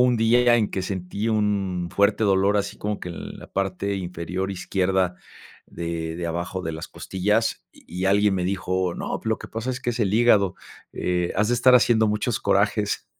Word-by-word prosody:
un 125 Hz, -1 st, +4 dB
día 120 Hz, +2 st, +4 dB
en 110 Hz, -3 st, +1 dB
que 95 Hz, -, -2 dB
sentí 95 Hz, +3 st, -3 dB
un 100 Hz, -5 st, 0 dB
fuerte 100 Hz, +2 st, +2 dB
dolor, 100 Hz, +1 st, +3 dB
así 100 Hz, -, -2 dB
como 105 Hz, 0 st, -3 dB
que -, -, -6 dB
en 85 Hz, -, -7 dB
la -, -, -12 dB
parte 100 Hz, +1 st, -1 dB
inferior 90 Hz, +1 st, -4 dB
izquierda 95 Hz, -1 st, 0 dB, 0.5 s
de, 85 Hz, -1 st, -4 dB
de 85 Hz, 0 st, -3 dB
abajo 85 Hz, +2 st, -3 dB
de 80 Hz, -, -3 dB
las 80 Hz, +1 st, -6 dB
costillas, 105 Hz, +4 st, -1 dB
y 90 Hz, +2 st, -8 dB
-y -, -, +2 dB
alguien 100 Hz, 0 st, +3 dB
me 90 Hz, -1 st, -1 dB
dijo: 95 Hz, -1 st, -1 dB
"No, -, -, -4 dB
lo 110 Hz, -1 st, 0 dB
que -, -, -9 dB
pasa 115 Hz, +3 st, -4 dB
es 130 Hz, 0 st, -4 dB
que 120 Hz, -, -1 dB
es 120 Hz, -, -4 dB
el 100 Hz, -2 st, +1 dB
hígado, 105 Hz, -5 st, +4 dB, 0.4 s
eh, 90 Hz, -1 st, -1 dB
has 105 Hz, +2 st, +2 dB
de 120 Hz, -, +2 dB
estar 125 Hz, +1 st, +5 dB
haciendo 115 Hz, -2 st, +4 dB
muchos 105 Hz, 0 st, 0 dB
corajes". -, -, +1 dB
100 Hz, 195 wpm, -24 LUFS, 90-110 Hz, 0.5 s, estar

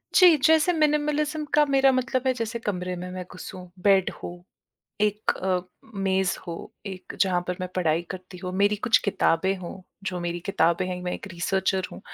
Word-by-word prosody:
जी, 360 Hz, -3 st, +8 dB
जैसे 320 Hz, +4 st, +4 dB
मिनिमलिज़्म 300 Hz, 0 st, +1 dB
का 295 Hz, 0 st, +6 dB
मेरा 270 Hz, 0 st, +5 dB
मतलब 255 Hz, 0 st, 0 dB
है, 260 Hz, -, +4 dB
जैसे 230 Hz, -1 st, -3 dB
कमरे 180 Hz, -4 st, -3 dB
में 180 Hz, +1 st, -6 dB
मैं 185 Hz, 0 st, -5 dB
घुसूँ, 180 Hz, 0 st, -9 dB
बेड 195 Hz, -2 st, +5 dB
हो। 175 Hz, 0 st, -7 dB, 0.6 s
एक 210 Hz, 0 st, +1 dB
अ, 185 Hz, -1 st, 0 dB, 0.3 s
मेज़ 190 Hz, -1 st, +1 dB
हो, 170 Hz, -, -4 dB, 0.3 s
एक 185 Hz, -1 st, -7 dB
जहाँ 185 Hz, -2 st, +3 dB
पर 180 Hz, -, -1 dB
मैं 185 Hz, -, -3 dB
पढ़ाई 165 Hz, -3 st, +2 dB
करती 185 Hz, -1 st, -8 dB
हूँ, 180 Hz, +1 st, -5 dB
मेरी 200 Hz, +2 st, +2 dB
कुछ 230 Hz, +3 st, +3 dB
किताबें 190 Hz, -1 st, +2 dB
हों, 185 Hz, +1 st, -8 dB, 0.2 s
जो 185 Hz, -3 st, -2 dB
मेरी 175 Hz, 0 st, -3 dB
किताबें 170 Hz, -2 st, +2 dB
हैं, 180 Hz, -1 st, -4 dB
मैं 180 Hz, -, -2 dB
एक -, -, -6 dB
रीसर्चर 190 Hz, +2 st, 0 dB
हूँ। -, -, -9 dB
190 Hz, 185 wpm, -26 LUFS, 180-250 Hz, 0.6 s, जी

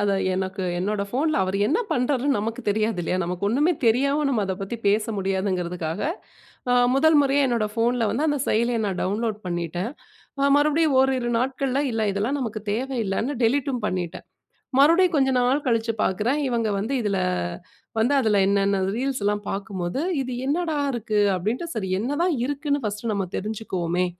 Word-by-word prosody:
அத 205 Hz, -1 st, +2 dB, 0.2 s
எனக்கு 190 Hz, +1 st, -3 dB, 0.2 s
என்னோட 200 Hz, +2 st, -1 dB
போன்ல, 300 Hz, +6 st, 0 dB
அவரு 190 Hz, +1 st, -1 dB
என்ன 325 Hz, -, +2 dB
பண்றாருன்னு 260 Hz, +1 st, +1 dB
நமக்கு 225 Hz, +4 st, -3 dB
தெரியாது 215 Hz, -1 st, 0 dB
இல்லையா? 180 Hz, -, -1 dB
"நமக்கு 180 Hz, +3 st, -3 dB
ஒண்ணுமே 295 Hz, +10 st, +2 dB
தெரியாம 275 Hz, +6 st, +2 dB
நம்ம 240 Hz, -6 st, +1 dB
அதை 190 Hz, -, -1 dB
பத்தி 195 Hz, +4 st, -4 dB
பேச 210 Hz, +2 st, +3 dB
முடியாதுங்கிறதுக்காக 185 Hz, -4 st, -2 dB, 0.7 s
அ -, -, +4 dB, 0.2 s
முதல் 315 Hz, +3 st, +5 dB
முறையா 280 Hz, 0 st, +3 dB
என்னோட 235 Hz, -4 st, +1 dB
ஃபோனில 235 Hz, +1 st, +1 dB
வந்து 280 Hz, +7 st, 0 dB
அந்த 290 Hz, -1 st, +1 dB
செயலிய 235 Hz, +2 st, +1 dB
நான் 190 Hz, -2 st, -3 dB
டவுன்லோட் 215 Hz, +2 st, -1 dB
பண்ணிட்டேன். 175 Hz, +3 st, -3 dB, 0.5 s
அ -, -, +2 dB
மறுபடியும் 300 Hz, 0 st, +3 dB
ஓரிரு 260 Hz, -2 st, +1 dB
நாட்கள்ல 265 Hz, +2 st, 0 dB
இல்ல 225 Hz, -1 st, -1 dB
இதெல்லாம் 220 Hz, +9 st, -1 dB
நமக்கு 220 Hz, -4 st, -4 dB
தேவையில்லன்னு 235 Hz, 0 st, -1 dB
டெலீட்ம் 255 Hz, 0 st, +1 dB
பண்ணிடேன்." 180 Hz, -2 st, -4 dB, 0.5 s
மறுபடியும் 335 Hz, +4 st, +5 dB
கொஞ்ச 270 Hz, -2 st, +3 dB
நாள் 260 Hz, +4 st, +1 dB
கழிச்சு 230 Hz, -1 st, +1 dB
பார்க்குறேன். 220 Hz, +10 st, 0 dB
இவங்க 230 Hz, -3 st, 0 dB
வந்து 220 Hz, +7 st, -2 dB
இதில 205 Hz, -3 st, 0 dB, 0.8 s
வந்து 245 Hz, +6 st, +3 dB
அதில 215 Hz, -4 st, +2 dB
என்னன்ன 200 Hz, 0 st, +2 dB, 0.2 s
ரீல்ஸ்லாம் 215 Hz, -6 st, -1 dB
பார்க்கும்போது, 195 Hz, +1 st, -3 dB, 0.2 s
இது 255 Hz, -1 st, -4 dB
என்னடா 315 Hz, +1 st, 0 dB
இருக்கு 220 Hz, -3 st, -1 dB, 0.2 s
அப்படின்ட்டு 220 Hz, -, -2 dB
சரி 195 Hz, -4 st, -2 dB
என்னதான் 290 Hz, -, 0 dB
இருக்குன்னு 285 Hz, 0 st, -1 dB
ஃபர்ஸ்ட் 210 Hz, +2 st, -4 dB
நம்ம 195 Hz, -1 st, -1 dB
தெரிஞ்சுக்குவோமே 185 Hz, -4 st, -2 dB
230 Hz, 155 wpm, -24 LUFS, 200-270 Hz, 0.8 s, முதல்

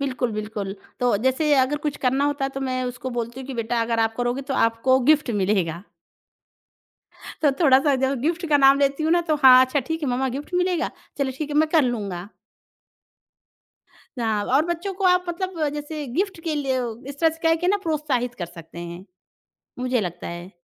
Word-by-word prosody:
बिल्कुल, 255 Hz, -3 st, -1 dB
बिल्कुल, 210 Hz, -2 st, -4 dB, 0.3 s
तो 245 Hz, -4 st, +3 dB
जैसे 295 Hz, +4 st, +2 dB
अगर 270 Hz, +3 st, +1 dB
कुछ 295 Hz, -, -2 dB
करना 270 Hz, +3 st, +2 dB
होता 290 Hz, -2 st, 0 dB
तो 270 Hz, 0 st, -6 dB
मैं 255 Hz, 0 st, -1 dB
उसको 250 Hz, +1 st, -5 dB
बोलती 235 Hz, +3 st, -4 dB
हूँ 260 Hz, -, -8 dB
कि 270 Hz, -, -6 dB
बेटा 230 Hz, 0 st, -1 dB
अगर 230 Hz, 0 st, -1 dB
आप 225 Hz, 0 st, +1 dB
करोगे 245 Hz, +2 st, -1 dB
तो -, -, -1 dB
आपको 230 Hz, +3 st, +3 dB
गिफ्ट 295 Hz, -4 st, +3 dB
मिलेगा। 185 Hz, -4 st, 0 dB, 1.6 s
तो 290 Hz, -, +5 dB
थोड़ा-सा 275 Hz, -1 st, +5 dB
जब 265 Hz, -1 st, 0 dB
गिफ्ट 335 Hz, +4 st, -1 dB
का 295 Hz, -, +5 dB
नाम 275 Hz, 0 st, +6 dB
लेती 280 Hz, +2 st, +1 dB
हूँ 320 Hz, +2 st, +2 dB
ना 345 Hz, -, +4 dB
तो 305 Hz, -, +3 dB
हाँ, 255 Hz, -1 st, +9 dB
अच्छा 260 Hz, +3 st, -1 dB
ठीक 320 Hz, +5 st, -4 dB
है 285 Hz, -, 0 dB
मम्मा 255 Hz, +2 st, 0 dB
गिफ्ट 300 Hz, +5 st, -8 dB
मिलेगा? 360 Hz, -1 st, +1 dB, 0.3 s
चलो 275 Hz, -1 st, 0 dB
ठीक 300 Hz, -1 st, -4 dB
है 295 Hz, -, -2 dB
मैं 310 Hz, 0 st, +4 dB
कर 315 Hz, -2 st, +4 dB
लूँगा। 200 Hz, -7 st, -3 dB, 1.9 s
हाँ। 220 Hz, -3 st, 0 dB
और 270 Hz, +7 st, +2 dB
बच्चों 345 Hz, +3 st, -3 dB
को 390 Hz, +1 st, -4 dB
आप 360 Hz, 0 st, +4 dB
मतलब 345 Hz, -3 st, -2 dB
जैसे 295 Hz, 0 st, -5 dB
गिफ्ट 380 Hz, 0 st, -1 dB
के 320 Hz, -2 st, -1 dB
लिए 270 Hz, -3 st, 0 dB, 0.3 s
इस 285 Hz, -, -11 dB
तरह 325 Hz, -, +4 dB
से 320 Hz, -, -12 dB
कह 325 Hz, 0 st, +4 dB
के 355 Hz, -, 0 dB
ना 410 Hz, -, +3 dB
प्रोत्साहित 290 Hz, -7 st, -1 dB
कर 175 Hz, -, -5 dB
सकते 165 Hz, 0 st, -12 dB
हैं, 175 Hz, +2 st, -7 dB, 0.7 s
मुझे 250 Hz, -1 st, 0 dB
लगता 180 Hz, -4 st, -5 dB
है। 175 Hz, +2 st, -7 dB
265 Hz, 200 wpm, -23 LUFS, 235-310 Hz, 1.9 s, हाँ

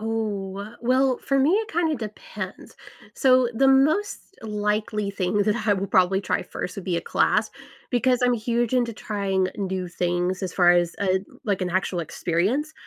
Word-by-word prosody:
Oh, 215 Hz, -3 st, -2 dB
wel 205 Hz, +4 st, -8 dB
well, 255 Hz, +1 st, +2 dB
for 275 Hz, -, 0 dB
me, 280 Hz, +4 st, +4 dB
it 425 Hz, +3 st, +1 dB
kinda 325 Hz, -3 st, +1 dB
depends. 215 Hz, -3 st, -8 dB, 0.4 s
So, 255 Hz, -2 st, +4 dB
the 270 Hz, +4 st, +3 dB
most 295 Hz, +10 st, +3 dB, 0.2 s
likely 210 Hz, -1 st, -1 dB
thing 195 Hz, 0 st, -1 dB
that 210 Hz, +2 st, +1 dB
I 205 Hz, -, +5 dB
will 195 Hz, 0 st, -2 dB
probably 185 Hz, +1 st, +3 dB
try -, -, -1 dB
first, 180 Hz, -, -6 dB
would 195 Hz, -, -6 dB
be 180 Hz, -3 st, -1 dB
a -, -, 0 dB
class, 215 Hz, +5 st, +1 dB, 0.4 s
because 250 Hz, 0 st, +2 dB
I'm 250 Hz, 0 st, +4 dB
huge 235 Hz, +1 st, -1 dB
into 240 Hz, -2 st, +1 dB
trying 195 Hz, -3 st, -1 dB
new 190 Hz, -2 st, -3 dB
things 175 Hz, +1 st, -1 dB
as 185 Hz, -3 st, -3 dB
far 175 Hz, -2 st, +5 dB
as, 175 Hz, -1 st, +2 dB
uh, 190 Hz, -1 st, +2 dB, 0.3 s
like, 200 Hz, -3 st, 0 dB
an 180 Hz, -, -2 dB
actual 185 Hz, 0 st, -1 dB
experience 185 Hz, -, -1 dB
210 Hz, 175 wpm, -24 LUFS, 190-245 Hz, 0.4 s, I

